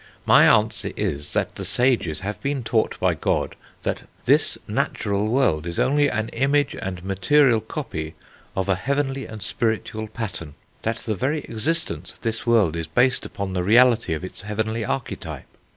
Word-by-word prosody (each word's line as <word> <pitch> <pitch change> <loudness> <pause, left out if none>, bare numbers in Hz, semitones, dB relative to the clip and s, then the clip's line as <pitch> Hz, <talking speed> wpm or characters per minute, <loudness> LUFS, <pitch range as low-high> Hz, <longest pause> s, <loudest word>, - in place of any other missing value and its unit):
My - - +7
answer - - +3
is 75 +1 -2
that - - 0
the 100 - -6
sages 105 -5 +1
have 105 +2 -4
been 140 -2 -1
taught 110 0 0
by - - +3
God - - -1 0.3
that - - -3 0.2
this - - +3
natural 100 +1 0
world 110 - +2
is 85 - -4
only 145 +2 +3
an 110 -1 -2
image 145 +2 +1
and 90 -1 -5
material 110 +6 +4
copy 80 -5 -5 0.4
of 95 0 -1
a 95 - +4
heavenly 135 +6 -1
and 110 -2 -8
spiritual 110 -1 -2
pattern; 90 -9 -6 0.3
that 115 +1 -1
the 110 - 0
very 140 - -1
existence 110 - -2
of - - -22
this 115 +1 -3
world 105 -9 +4
is 85 -1 -3
based 125 +10 +2
upon 100 -1 -4
the 90 -1 0
reality 115 -3 +5
of 80 - -7
its 95 - -6
heavenly 110 +2 -2
archetype.... 130 +2 -4
110 Hz, 170 wpm, -23 LUFS, 95-125 Hz, 0.4 s, My